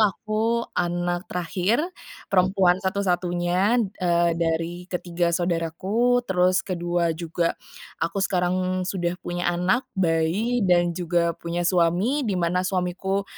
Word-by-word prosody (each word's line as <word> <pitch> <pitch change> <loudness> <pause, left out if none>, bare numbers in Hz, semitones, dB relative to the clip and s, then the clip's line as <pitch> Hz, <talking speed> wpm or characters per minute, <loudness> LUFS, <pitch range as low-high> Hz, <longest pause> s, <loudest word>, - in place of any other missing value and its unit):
aku 220 +3 +1
anak 175 0 -1
terakhir, 180 - 0 0.5
perempuan 185 -1 +3
satu-satunya, 180 +2 +1 0.2
eee, 170 -1 +2
dari 170 +2 -2
ketiga 175 -1 -1
saudaraku, 185 +8 0
terus, 185 0 +2
kedua 175 -2 0
juga, 170 0 -1 0.5
aku 165 +4 -1
sekarang 185 0 0
sudah 175 -3 -1
punya 175 0 -4
anak 180 +9 +1
bayi, 185 +7 +1
dan 175 -2 +3
juga 170 -1 +1
punya 170 +1 -3
suami, 180 - +2
dimana 180 -2 +1
suamiku, 190 +1 -1
180 Hz, 110 wpm, -24 LUFS, 175-190 Hz, 0.5 s, perempuan